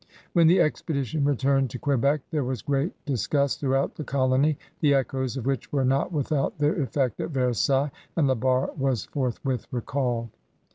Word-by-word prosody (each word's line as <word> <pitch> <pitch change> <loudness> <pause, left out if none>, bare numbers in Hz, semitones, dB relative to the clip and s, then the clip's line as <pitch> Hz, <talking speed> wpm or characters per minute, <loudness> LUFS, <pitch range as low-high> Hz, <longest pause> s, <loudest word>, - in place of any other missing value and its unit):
When 170 -2 +5
the 180 +3 +5
expedition 150 -2 0
returned 135 -1 +2
to 125 - -6
Quebec 140 +2 +1
there 150 -3 0
was 125 0 -3
great 145 +3 0
disgust 140 +1 0
throughout 135 -1 0
the 155 - -6
colony, 135 +2 +2 0.2
the 145 -3 +4
echoes 130 -1 -1
of 125 - -4
which 135 -3 -2
were 135 -2 +1
not 135 +6 +1
without 145 -2 -1
their 150 +2 +1
effect 130 -2 -1
at - - -2
Versailles, 135 +1 +1 0.2
and 155 -5 +3
La 130 - +3
Barre 130 +2 +1
was 135 -6 0
forth 130 -4 -2
with 130 -3 -1
recalled. 120 -2 -2
135 Hz, 175 wpm, -26 LUFS, 130-145 Hz, 0.2 s, When